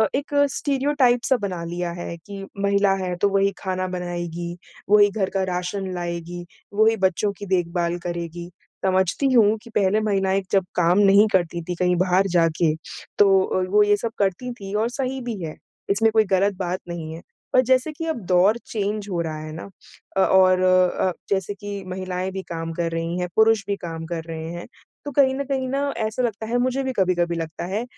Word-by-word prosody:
एक 285 Hz, +1 st, -3 dB, 0.2 s
स्टीरियोटाइप 275 Hz, -2 st, +2 dB
सा 260 Hz, -, +3 dB
बना 190 Hz, -6 st, -4 dB
लिया 175 Hz, +1 st, -3 dB
है 170 Hz, -, -5 dB
कि 200 Hz, -1 st, -7 dB, 0.2 s
महिला 200 Hz, 0 st, +3 dB
है 180 Hz, -1 st, -2 dB
तो 205 Hz, -, +4 dB
वही 195 Hz, 0 st, +2 dB
खाना 185 Hz, -1 st, -2 dB
बनाएगी, 175 Hz, -1 st, -4 dB, 0.3 s
वही 205 Hz, 0 st, +6 dB
घर 200 Hz, -2 st, -1 dB
का 195 Hz, -1 st, +1 dB
राशन 180 Hz, +2 st, -3 dB
लाएगी, 175 Hz, 0 st, -5 dB, 0.3 s
वही 220 Hz, +2 st, +4 dB
बच्चों 190 Hz, +2 st, +1 dB
की 205 Hz, -, -7 dB
देखभाल 175 Hz, -2 st, 0 dB
करेगी, 170 Hz, 0 st, -5 dB, 0.4 s
समझती 190 Hz, +8 st, +2 dB
हूँ 220 Hz, -3 st, +5 dB
कि -, -, -13 dB
पहले 200 Hz, +1 st, +3 dB
महिलाएँ 195 Hz, -2 st, +1 dB
जब 195 Hz, -2 st, +3 dB
काम 175 Hz, +2 st, +3 dB
नहीं 205 Hz, +1 st, +6 dB
करती 175 Hz, -2 st, +1 dB
थीं 180 Hz, +2 st, -4 dB
कहीं 180 Hz, 0 st, +2 dB
बाहर 185 Hz, +2 st, +2 dB
जाके, 165 Hz, -1 st, +2 dB, 0.4 s
तो 195 Hz, -2 st, +6 dB
अ, 185 Hz, -, 0 dB
वो 210 Hz, +2 st, +5 dB
ये 205 Hz, 0 st, +3 dB
सब 225 Hz, +2 st, -3 dB
करती 200 Hz, +5 st, 0 dB
थी 200 Hz, -4 st, -8 dB
और 220 Hz, +2 st, +1 dB
सही 260 Hz, +1 st, -3 dB
भी 235 Hz, -5 st, -5 dB
है 155 Hz, -1 st, -5 dB, 0.3 s
इसमें 220 Hz, +3 st, +3 dB
कोई 220 Hz, 0 st, +4 dB
गलत 195 Hz, +1 st, +2 dB
बात 185 Hz, -1 st, -2 dB
नहीं 160 Hz, -2 st, -5 dB
है, 165 Hz, -, -9 dB, 0.3 s
पर 255 Hz, -, +6 dB
जैसे 260 Hz, +4 st, +3 dB
कि 325 Hz, +2 st, -6 dB
अब 320 Hz, -6 st, -2 dB
दौर 185 Hz, +5 st, +4 dB
चेंज 210 Hz, -1 st, -3 dB
हो 175 Hz, -, -1 dB
रहा 160 Hz, -2 st, -4 dB
है 155 Hz, 0 st, -7 dB
ना, 165 Hz, +5 st, -8 dB, 0.5 s
अ, -, -, +4 dB
और 185 Hz, -1 st, +5 dB
अ, 185 Hz, 0 st, +3 dB, 0.2 s
जैसे 195 Hz, 0 st, 0 dB
कि 200 Hz, -1 st, -7 dB
महिलाएँ 185 Hz, 0 st, -3 dB
भी 190 Hz, 0 st, -4 dB
काम 165 Hz, -1 st, -4 dB
कर 170 Hz, 0 st, -2 dB
रही 165 Hz, +2 st, -2 dB
हैं, 180 Hz, -, -1 dB
पुरुष 220 Hz, -2 st, +4 dB
भी 200 Hz, -, 0 dB
काम 165 Hz, -1 st, -5 dB
कर 165 Hz, -1 st, -4 dB
रहे 160 Hz, 0 st, -5 dB
हैं, 175 Hz, 0 st, -7 dB, 0.4 s
तो 290 Hz, -, -4 dB
कहीं 270 Hz, -1 st, +4 dB
न 280 Hz, -, -2 dB
कहीं 265 Hz, -1 st, -1 dB
ना 275 Hz, -, -1 dB, 0.2 s
ऐसा 220 Hz, +3 st, -1 dB
लगता 220 Hz, -2 st, -2 dB
है 240 Hz, +2 st, 0 dB
मुझे 255 Hz, +2 st, 0 dB
भी 265 Hz, -, -1 dB
कभी-कभी 180 Hz, -4 st, +1 dB
लगता 165 Hz, 0 st, -5 dB
है 200 Hz, +5 st, -2 dB
190 Hz, 200 wpm, -23 LUFS, 175-215 Hz, 0.5 s, वही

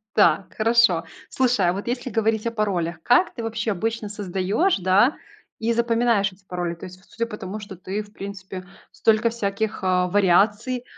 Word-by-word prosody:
Так, 205 Hz, -2 st, +3 dB
хорошо. 225 Hz, -6 st, +4 dB, 0.3 s
Слушай, 245 Hz, -8 st, +2 dB
а 175 Hz, -, +1 dB
вот 200 Hz, +4 st, -6 dB
если 245 Hz, +1 st, -2 dB
говорить 220 Hz, 0 st, 0 dB
о 230 Hz, -, 0 dB
паролях, 175 Hz, -6 st, -1 dB
как 250 Hz, +9 st, +4 dB
ты 230 Hz, -, -6 dB
вообще 225 Hz, -1 st, -2 dB
обычно 220 Hz, +2 st, -2 dB
создаешь, 205 Hz, -, 0 dB
да, 190 Hz, -, +3 dB, 0.4 s
и 230 Hz, +1 st, +1 dB
запоминаешь 230 Hz, -3 st, +2 dB
эти 190 Hz, +1 st, -23 dB
пароли? 175 Hz, -2 st, -3 dB
То 165 Hz, -, -10 dB
есть 185 Hz, 0 st, -12 dB
судя 230 Hz, -, -2 dB
по 215 Hz, -2 st, -8 dB
тому, 195 Hz, +3 st, -6 dB
что 200 Hz, -2 st, -9 dB
ты, 190 Hz, +4 st, -4 dB
в 205 Hz, -, -19 dB
принципе, 190 Hz, -2 st, -8 dB, 0.3 s
столько 225 Hz, +1 st, +2 dB
всяких, 220 Hz, -1 st, -2 dB
а, 180 Hz, -1 st, +2 dB
вариаций, 205 Hz, +6 st, +2 dB
210 Hz, 175 wpm, -23 LUFS, 185-230 Hz, 0.4 s, хорошо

